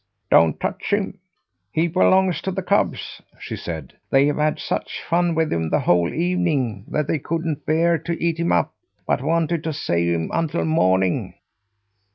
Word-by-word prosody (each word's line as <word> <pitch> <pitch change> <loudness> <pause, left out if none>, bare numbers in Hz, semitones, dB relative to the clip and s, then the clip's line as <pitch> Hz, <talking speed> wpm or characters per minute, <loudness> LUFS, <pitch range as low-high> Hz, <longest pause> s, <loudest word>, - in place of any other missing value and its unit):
"Don't 80 -2 +5
touch - - -3
him! 200 -1 -1 0.5
He 160 +7 +1
belongs 185 0 +3
to 190 - -2
the - - -3
cubs," - - 0 0.2
she - - -6
said. 80 -5 -6 0.2
"They 135 +1 +4
have 145 0 0
had 150 0 +1
such - - -3
fun 170 0 +1
with 160 -1 +1
him 80 -1 -1
the - - +1
whole 85 -1 +2
evening 155 - 0
that 150 - -1
they 155 - 0
couldn't 165 0 -3
bear 165 +1 +3
to 165 +2 -4
eat 165 -1 0
him 170 - +1
up, 85 - +1 0.3
but - - 0
wanted 165 +2 0
to 160 - -1
save 85 - 0
him 85 -1 -1
until 165 0 0
morning." 95 - +1
160 Hz, 175 wpm, -22 LUFS, 100-170 Hz, 0.5 s, Don't